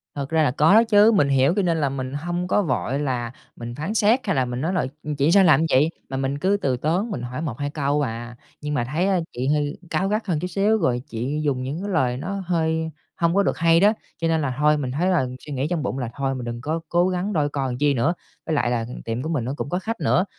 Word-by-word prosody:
Thật 140 -1 -4
ra 160 -1 +3
là 145 - +2
có 150 +7 +4
đó 225 +2 +7
chứ. 215 -1 +5
Mình 170 -10 +3
hiểu 135 +3 +3
cho 205 - +2
nên 170 -3 +1
là 140 - +2
mình 130 -1 -4
hông 175 +4 -3
có 205 - +2
vội 130 - -1
là 125 -5 -2 0.2
mình 120 0 -7
phán 155 - -3
xét 220 +3 +4
hay 195 - +1
là 130 - +2
mình 125 +1 -4
nói 165 +5 -1
là 180 - +1 0.2
"Ừm, 150 0 -3
chị 145 +3 +2
sao 195 +1 +6
làm 155 -6 +6
như 160 - +2
vậy?", 145 +4 +4 0.2
mà 135 - -3
mình 135 +1 -1
cứ 195 +5 +2
từ 130 -3 0
tốn 175 - 0
mình 125 - -3
hỏi 125 +4 -5
1-2 145 -2 -3
câu 145 0 0
à. 120 -2 -4 0.3
Nhưng 150 0 -3
mà 125 - +1
thấy, 155 +10 -1
a, 190 -2 +2
chị 125 +2 -2
hơi 145 0 0
cáu 190 - 0
gắt 215 +2 -1
hơn 165 -5 0
chút 180 - -3
xíu 205 +4 +2
rồi 125 - 0
chị 135 +4 -3
dùng 135 -4 0
những 140 +7 -4
cái 205 - -4
lời 125 -7 +1
nó 195 +8 -4
hơi 160 -2 0 0.3
hông 170 +1 +1
có 200 - +4
được - - 0
hay 165 0 +4
đó. 205 +4 +5 0.3
Cho 165 - +1
nên 160 -1 +1
là 135 -3 -1
thôi, 150 +1 +3
mình 135 -4 -3
thấy 170 +8 0
là, 175 -8 +2 0.2
suy 150 - -6
nghĩ 135 +2 -1
trong 170 -4 -1
bụng 130 +1 -2
là 125 -3 -3
"Thôi 135 -1 -2
mình 125 -2 -5
đừng 120 0 -5
có 155 +5 -2
cố 175 +1 +3
gắng 185 +3 -2
đôi 150 -4 +1
co 140 -2 -2
làm 125 -2 -3
chi 145 +1 +2
nữa." 140 +7 +1 0.3
Với 160 - -1
lại 120 -4 +1
là 115 -2 0 0.2
tiệm 115 +2 -2
của 155 - -4
mình 145 -8 -1
nó 130 - -2
cũng - - -4
có 180 - -1
khách 225 +4 -4
nữa, 185 - +2
150 Hz, 290 wpm, -23 LUFS, 130-175 Hz, 0.3 s, đó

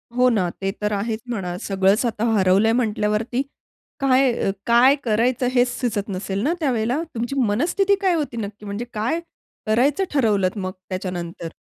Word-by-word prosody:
हो 250 0 +4
ना, 190 -7 +1
ते 195 - 0
तर 210 - 0
आहेच 220 +2 -2
म्हणा. 185 -7 -3
सगळंच 195 +4 +2
आता 225 -1 -2
हरवलंय 195 +2 +4
म्हटल्यावरती 220 +1 0 0.6
काय 265 -1 +4 0.3
काय 240 +4 +6
अ, - - -14
करायचं 240 +3 +1
हेच 250 -1 +3
सुचत 215 -5 -2
नसेल 195 +1 -3
ना 310 - +2
त्यावेळेला? 250 -2 0
तुमची 240 +4 -3
मनस्थिती 345 - +2
काय 380 -2 +3
होती 290 -7 -3
नक्की? 210 -1 -6
म्हणजे 205 +4 -4
काय 225 +10 -1 0.5
करायचं 260 - +2
ठरवलत 210 -8 +2
मग 185 -2 -3 0.2
त्याच्यानंतर? 180 -3 -4
225 Hz, 155 wpm, -22 LUFS, 200-255 Hz, 0.6 s, काय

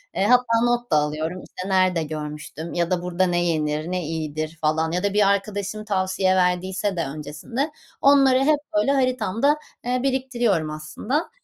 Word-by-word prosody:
Eee, 195 - +1
hatta 245 -2 +4
not 240 -3 0
da - - +4
alıyorum 155 +4 -2
işte 185 +2 -7
nerede 185 -3 +2
görmüştüm 150 +1 -6
ya 170 0 0
da 175 -1 +1
burada 180 +1 0
ne 175 -1 +1
yenir 155 0 -1
ne 180 -1 -1
iyidir, 155 0 -4
falan, 160 +1 +1
ya 180 +3 -1
da 200 -1 0
bir 205 -1 +4
arkadaşım 205 +1 -2
tavsiye 190 -1 +1
verdiyse 185 +2 0
de 165 - 0
öncesinde, 155 - -4 0.3
onları 275 -2 +5
hep 295 +2 +3 0.2
böyle 280 -3 +3
haritamda, 255 +1 +1 0.3
eee, 250 +1 0
biriktiriyorum 240 - 0
aslında. 180 - -3
185 Hz, 165 wpm, -23 LUFS, 160-240 Hz, 0.3 s, onları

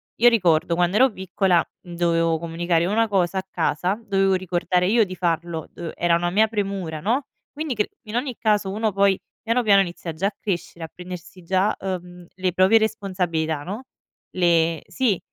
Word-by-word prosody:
io 240 +1 +6
ricordo, 170 -7 +2
quando 175 +3 +2
ero 260 +2 +5
piccola, 190 -2 +1 0.2
mhmm, 175 -1 -11
dovevo 165 -1 +2
comunicare 170 0 0
una 225 +4 +2
cosa 190 -2 +1
a 190 - -7
casa, 180 +4 -1
dovevo 195 -2 +2
ricordare 180 0 0
io 225 +2 +4
di 185 -1 -7
farlo, 170 -2 -2
uhm, 170 -2 -6
era 170 0 +2
una 175 +1 0
mia 215 +4 +4
premura, 195 -7 -3
no, 245 +7 0 0.3
quindi 300 -4 -4
cr 210 - 0 0.2
in 215 - -6
ogni 250 0 -2
caso, 210 -3 +1
uno 215 +1 0
poi 195 -1 +3 0.2
piano 235 +2 +1
piano 200 -2 +6
inizia 175 -2 -4
già 185 +5 0
a 200 - -5
crescere 170 -4 -4
a - - -13
prendersi 180 0 -9
già, 190 +4 +1
uhm, 180 -2 -6
le 185 -2 -1
proprie 190 +4 +5
responsabilità, 180 -8 -1
no, 205 - -6 0.5
le 170 -3 +2
sì, 240 -8 0
185 Hz, 180 wpm, -23 LUFS, 170-210 Hz, 0.5 s, io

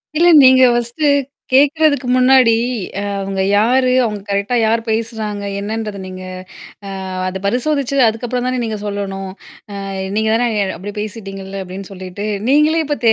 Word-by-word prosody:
இல்ல. 340 +3 +4 0.2
நீங்க 260 0 +7
ஃபர்ஸ்ட்டு 240 +6 -1 0.5
கேட்கறதுக்கு 290 -1 +3
முன்னாடி, 255 -2 +5 0.5
அ, - - -3 0.2
அவங்க 195 0 -3 0.2
யாரு, 250 +4 +3
அவங்க 210 -2 -4
கரெக்ட்டா 200 +4 0
யார் 225 +1 +1
பேசுறாங்க 220 -2 -3 0.2
என்னன்றத 210 0 -4
நீங்க, 185 0 -8 0.6
அ, - - -6 0.4
அதை 190 +1 -4
பரிசோதிச்சி, 275 +4 0
அதுக்கப்புறம் 245 +3 -3
தானே 255 0 -1
நீங்க 220 -2 -3
சொல்லணும். 195 -1 -4 0.5
அ, - - -6 0.3
நீங்க 220 0 +1
தானே, 240 +2 +2 0.2
அ, - - -3
அப்படி 200 +4 -7
பேசிகிட்டீங்கல்ல 195 -2 -7
அப்படின்னு 190 +2 -9
சொல்லிட்டு 190 +2 -7 0.2
நீங்களே 305 +3 +3
இப்ப, 295 0 -1
தெ 225 - +7
225 Hz, 145 wpm, -17 LUFS, 200-255 Hz, 0.6 s, நீங்க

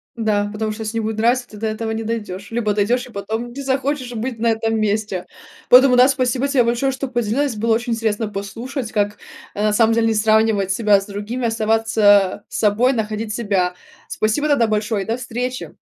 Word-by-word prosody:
Да, 210 -3 0
потому 215 +1 -3
что 215 +1 -7
если 220 +1 -4
не - - 0
будет 220 0 -3
нравиться, 245 +3 +1
ты 210 - -11
до 220 +1 -2
этого 220 +1 -3
не 225 0 -3
дойдёшь, 210 -3 -5
либо 225 -3 0
дойдёшь, 235 +5 +1
и - - -14
потом 220 +4 -4
не 280 - -6
захочешь 270 -1 -2
быть 235 +1 -4
на 230 - +1
этом 225 0 0
месте. 210 -3 -1 0.4
Поэтому 255 0 +7
да, 250 +1 +7
спасибо 260 0 0
тебе 275 -3 +3
большое, 240 +3 0
что 270 +1 -4
поделилась. 240 +2 -1
Было 225 +1 +1
очень 235 +1 -2
интересно 225 -1 -1
послушать, 220 +5 -5
как, 205 -1 -1 0.4
э, 205 - -2
на 215 0 +2
самом 225 +1 +3
деле 225 0 +2
не 225 - +2
сравнивать 215 -2 +2
себя 210 -1 +3
с 195 - -8
другими, 210 +5 -4
оставаться 215 -3 +2
собой, 225 +5 +2
находить 215 -1 -3
себя. 195 -5 0 0.3
Спасибо 220 +8 0
тогда 245 -6 +3
большое, 215 -1 -1
и - - -13
до 225 - 0
встречи. 250 0 -5
225 Hz, 200 wpm, -20 LUFS, 210-245 Hz, 0.4 s, Поэтому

